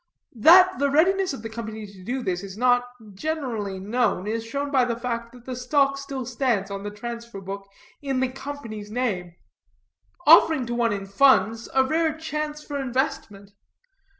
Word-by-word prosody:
That 365 +10 +6
the 280 0 +2
readiness 370 +6 +3
of 270 -6 -7
the 225 - -5
Company 220 -1 -6
to 195 -2 -14
do 250 +5 -3
this 180 -3 -2
is 195 0 -9
not 245 0 +3 0.3
generally 225 -6 -3
known, 210 -1 0
is 225 +2 -2
shown 280 +5 -4
by 265 -3 +4
the 240 -1 -1
fact 235 -1 -4
that 245 -1 -16
the 255 - -5
stock 275 +2 +2
still 275 -2 -5
stands 230 -5 -1
on 195 0 -4
the 205 - -5
transfer 235 0 -7
book 195 +1 -7 0.3
in 270 -2 -1
the 260 0 +1
Company's 255 -6 -7
name, 200 -8 -2 0.9
offering 315 -4 +6
to 240 - -4
one 235 -1 +1
in 200 -1 -3
funds 230 +1 +3
a 265 - +5
rare 315 +3 0
chance 300 -1 -4
for 285 -1 -5
investment. 240 -6 -3
245 Hz, 175 wpm, -24 LUFS, 210-275 Hz, 0.9 s, That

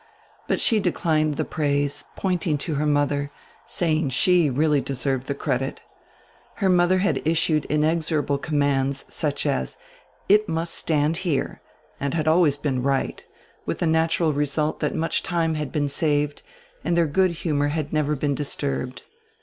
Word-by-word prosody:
But - - +1
she 225 - +3
declined 155 -5 +1
the - - -1
praise, 145 -1 -1
pointing 175 -5 0
to 155 +3 -3
her 150 +1 0
mother, 145 -1 +1 0.4
saying 155 -4 0
she 175 +4 +3
really 145 +2 +2
deserved 135 -1 -2
die 140 - -2
credit 135 -1 -2 0.8
Her 195 -3 +1
modier 180 +1 +4
had 200 - +1
issued 160 -1 +1
inexorable 150 -2 0
commands, 140 -2 0
such - - -1
as, 65 0 -1 0.5
"It 210 +1 +4
must 165 +1 -2
stand 155 0 +1
here," 170 -7 -2 0.4
and 140 +1 -2
had 155 -2 -1
always 160 -3 +4
been 135 -3 -1
right, 135 +1 -1 0.4
widi - - -1
die - - -1
natural 160 0 +2
result 150 +1 0
diat - - -1
much 165 +1 0
time 165 -2 0
had 150 -3 -3
been 145 -1 0
saved 145 0 0 0.4
and 170 - 0
dieir 170 - +4
good 185 0 +3
humor 145 -3 +1
had 150 0 -3
never 150 -1 +1
been 145 0 0
disturbed. 140 -2 -3
150 Hz, 155 wpm, -24 LUFS, 140-165 Hz, 0.8 s, modier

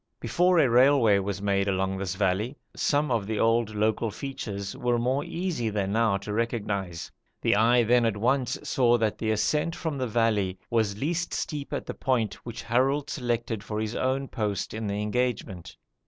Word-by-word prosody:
Before 180 +1 +2
a 155 - +5
railway 120 -4 +5
was 100 +1 -4
made 100 -1 +1
along 95 0 0
this 95 -1 -3
valley, 105 +7 0 0.2
some 145 -1 +1
of 110 -4 0
the 110 -1 -2
old 115 -1 +2
local 110 +2 +1
features 105 -6 -5
were 120 -1 0
more 130 +4 0
easy 170 -10 -2
than 100 -2 -1
now 110 -2 +2
to 100 +2 -6
recognise. 105 -6 -2 0.3
The - - +2
eye 120 +3 +4
then 120 +1 +4
at 105 -2 -1
once 125 +3 +1
saw 120 -2 +3
that 110 -2 -1
the 110 - -1
ascent 150 +10 +1
from 155 -5 -3
the 130 - -1
valley 105 -5 +1
was 110 -4 +1
least 170 +8 -2
steep 145 -3 -4
at - - -3
the - - -5
point 115 -7 0
which 120 -1 -7
Harold 135 +5 +1
selected 120 -4 -2
for 105 -1 -4
his 110 +1 -3
own 135 +1 0
post 105 -6 -3
in 110 0 -4
the 100 0 -2
engagement. 105 -6 -2
115 Hz, 185 wpm, -27 LUFS, 105-130 Hz, 0.3 s, a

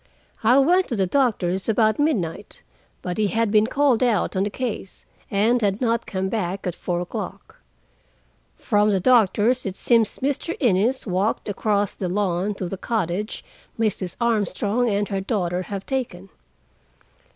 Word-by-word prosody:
I 240 +4 +5
went 355 +7 +4
to 240 - -3
the 195 -3 +1
doctor's 190 -5 0
about 220 +3 +2
midnight, 205 - -2 0.4
but 180 +3 -3
he 210 - +3
had 225 +2 0
been 215 0 +4
called 275 -2 +2
out 235 -6 +1
on 190 +2 +1
a - - -2
case, 225 -4 -5 0.2
and 225 +5 +2
had 200 -1 +1
not 230 -2 0
come 190 -1 -2
back 190 -2 -3
at 180 - -1
four 175 0 -3
o'clock. 180 - -7 1.0
From 210 -2 +2
the 195 -2 +2
doctor's 235 +2 +3
it 190 -2 -4
seems 230 -2 +2
Mr. 285 +5 -2
Innes 240 +1 +2
walked 195 +2 -1
across 205 0 0
the 185 - -4
lawn 195 +1 -1
to 190 - -4
the 195 - -5
cottage 210 -1 -3 0.3
Mrs. 200 -5 -1
Armstrong 225 0 +1
and 205 0 0
her 195 -2 -2
daughter 185 -4 -1
have 195 +1 -6
taken. 215 -9 -4
210 Hz, 155 wpm, -23 LUFS, 190-235 Hz, 1.0 s, I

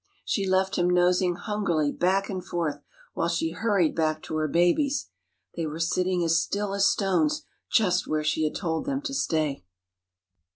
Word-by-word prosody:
She 195 -3 -1
left 190 +1 +1
him 175 0 +2
nosing 180 0 +3
hungrily 175 -9 -1
back 195 +2 +1
and 185 -3 -4
forth, 155 -4 -3 0.3
while 165 - 0
she 170 -1 -1
hurried 195 -3 +1
back 155 -1 0
to 155 - -5
her 155 0 0
babies. 175 - +1 0.5
They 165 -2 -2
were 155 +2 -6
sitting 180 +2 +1
as 165 0 +3
still 200 -1 -2
as 200 -1 +3
stones 295 - +1 0.3
just 185 -5 +2
where 155 0 0
she 155 +1 0
had 155 - -1
told 165 +2 -2
them 280 0 -2
to 275 -3 -4
stay. 155 - -1
180 Hz, 170 wpm, -26 LUFS, 160-195 Hz, 0.5 s, nosing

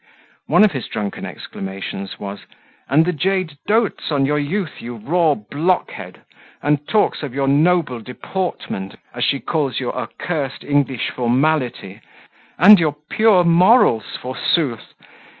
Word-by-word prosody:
One - - +5
of 215 - +5
his 135 -4 -5
drunken 105 -1 -4
exclamations 95 0 -7
was, 100 0 -7 0.4
"And 155 +5 +4
the 180 - 0
jade 180 -2 -1
doats 220 -5 0
on 140 -2 +2
your 150 +2 +1
youth, 165 +4 -3
you 120 +1 -7
raw 155 +7 +1
blockhead! 140 - -2 0.4
and 145 0 0
talks 215 - +1
of 140 -4 -6
your 135 -1 0
noble 150 -2 +2
deportment, 125 - -5 0.2
as 120 - -3
she 140 - +1
calls 140 -6 -1
your 125 - -3
accursed 140 +1 -4
English 140 -4 0
formality 125 -5 -1 0.6
and 205 +1 +8
your 155 -3 0 0.2
pure 215 -5 +4
morals, 170 - +4
forsooth! 130 -1 -2
145 Hz, 130 wpm, -19 LUFS, 120-175 Hz, 0.6 s, and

